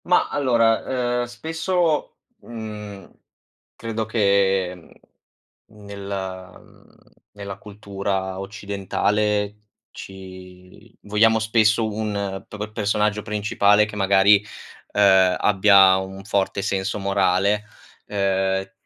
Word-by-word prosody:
Mah, 180 - +2
allora, 120 -1 +1
ehm, - - -2
spesso, 160 +6 -2 0.3
mhmm, 105 - -9 0.7
credo 115 -1 -4
che, 100 -4 +1
mhmm, 85 - -23 0.5
nel 100 -1 -9 0.5
mhmm, - - -20 0.4
nella 100 -1 -8
cultura 100 -2 -4
occidentale 105 0 -2 0.3
ci 95 -1 -13
vogliamo 110 +2 +3
spesso 110 0 +2
un 100 -3 -4
p 105 - -10
p 105 +1 -6
personaggio 105 -1 0
principale 105 0 +2
che 105 - -9
magari, 100 0 +5 0.6
uhm, 95 -2 +4
abbia 95 -1 +5
un 95 +1 -7
forte 100 -1 -1
senso 95 +1 -2
morale, 100 +1 +1 0.4
uhm, 95 -1 -1
100 Hz, 95 wpm, -22 LUFS, 95-110 Hz, 0.7 s, magari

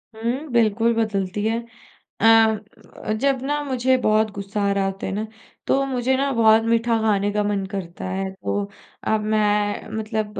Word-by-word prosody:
हुँ, 240 +7 -3
बिल्कुल 230 0 +2
बदलती 205 -2 -1
है 225 +1 +1 0.6
अ, 220 -1 +2
जब 275 -2 +1
ना 295 +1 -1
मुझे 260 -2 +1
बहुत 215 0 +3
गुस्सा 200 +1 -4
आ - - +2
रहा 195 -1 0
होता 195 0 -3
ना, 210 +3 -3 0.4
तो 275 - +2
मुझे 260 -1 0
ना 275 +1 0
बहुत 225 -1 +5
मीठा 230 0 +2
खाने 205 -2 +1
का 210 0 0
मन 205 -1 -1
करता 180 -4 -6
है, 190 +1 -2
तो 200 +1 -3 0.4
अब 220 0 +2
मैं 210 -1 +1
मतलब 215 -1 -3
220 Hz, 160 wpm, -22 LUFS, 205-235 Hz, 0.6 s, बहुत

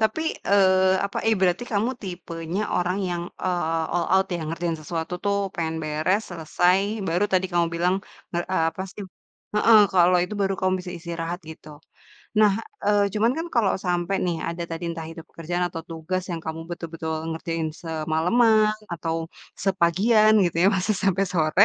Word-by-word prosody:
Tapi, 220 +8 +1 0.3
eee, 190 -1 +5
apa, 200 - -4
eh 225 - +4
berarti 185 +4 +2
kamu 215 +5 +1
tipenya 175 0 -4
orang 180 +2 0
yang, 175 -1 -2 0.2
eee, 165 -3 0
all 175 0 +1
out 190 0 +4
yang 160 -2 -5
ngerjain 165 0 -2
sesuatu 160 +2 -4
tuh 200 0 +2 0.2
pengen 160 -1 -2
beres 155 +6 +1
selesai 175 +2 +2 0.3
baru 175 +5 +2
tadi 185 0 +3
kamu 170 -1 +3
bilang 175 +2 +2 0.4
nge 175 - 0 0.3
apa 185 - -5
sih 205 - -8 0.5
heeh, 220 +1 +7
kalau 180 0 +5
itu 180 - -6
baru 195 0 +1
kamu 185 0 +2
bisa 180 - -6
istirahat 170 0 -4
gitu. 155 -1 -12 0.7
Nah, 210 -2 +6 0.3
eee, 205 0 +4
cuman 225 +3 +3
kan 330 - -3
kalau 225 -5 +3
sampai 175 +2 0
nih 175 -2 0
ada 170 +1 -4
tadi 165 +1 -4
entah 165 -1 -6
itu 165 0 -9
pekerjaan 175 +2 -3
atau 165 -1 -6
tugas 165 +3 -3
yang 170 -1 -3
kamu 160 0 -4
betul-betul 165 -1 -5 0.2
ngerjain 165 -1 -3
semaleman 180 +8 +2 0.2
atau 165 -1 -2 0.5
sepagian 200 +4 +4
gitu 170 -2 -1
ya, - - +7
masa 190 +3 +1
sampe 195 0 +2
sore 165 +3 +4
175 Hz, 165 wpm, -24 LUFS, 165-195 Hz, 0.7 s, heeh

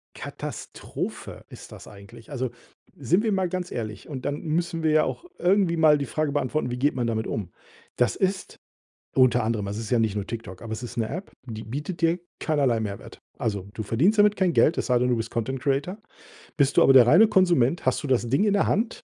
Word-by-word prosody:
Katastrophe - - -7
ist - - -12
das - - -12
eigentlich. 110 +5 -14
Also, 130 -3 -3 0.4
sind 170 - +1
wir 220 - +1
mal 190 -2 0
ganz 180 0 -4
ehrlich. 110 -4 -6
Und 135 -4 -7
dann 145 +1 -2
müssen 165 +1 -2
wir 155 - +3
ja 155 0 +4
auch - - -4
irgendwie 180 -2 +2
mal 155 -2 +5
die 140 - -3
Frage 150 +3 -2
beantworten, 145 -1 -1
wie 125 - -4
geht 140 +4 +1
man 120 -2 -2
damit 110 -1 -1
um? 95 -5 -4 0.4
Das 125 -2 +1
ist 190 0 -2 0.6
unter 125 -3 +4
anderem, 110 -2 -1
es 100 - -4
ist 110 - -6
ja 125 - +2
nicht 110 -3 +1
nur 100 -1 -3
TikTok 110 -6 -7
aber 110 -1 -6
es 115 - -6
ist 120 0 -8
'ne 115 -2 -1
App, 180 +6 -6
die 110 -3 -7
bietet 150 - -6
dir 165 +2 +2 0.2
keinerlei 140 -7 +1
Mehrwert. 100 -2 -7 0.2
Also, 100 -3 -3
du 110 - -5
verdienst 160 - +2
damit 205 0 +5
kein 185 -3 +1
Geld, 160 - +3
es - - -2
sei 125 -1 +3
denn, 125 - +1
du 120 - +2
bist 115 0 -4
Content-Creator. 135 - -2 0.6
Bist 140 -2 +2
du - - +7
aber 135 - +6
der 125 -3 +8
reine 185 - +7
Konsument, 175 - +2
hast - - +1
du 145 - -3
das 125 -2 +1
Ding 140 - +2
in 205 - +2
der 200 - +2
Hand, 225 +4 -1
135 Hz, 225 wpm, -25 LUFS, 115-170 Hz, 0.6 s, der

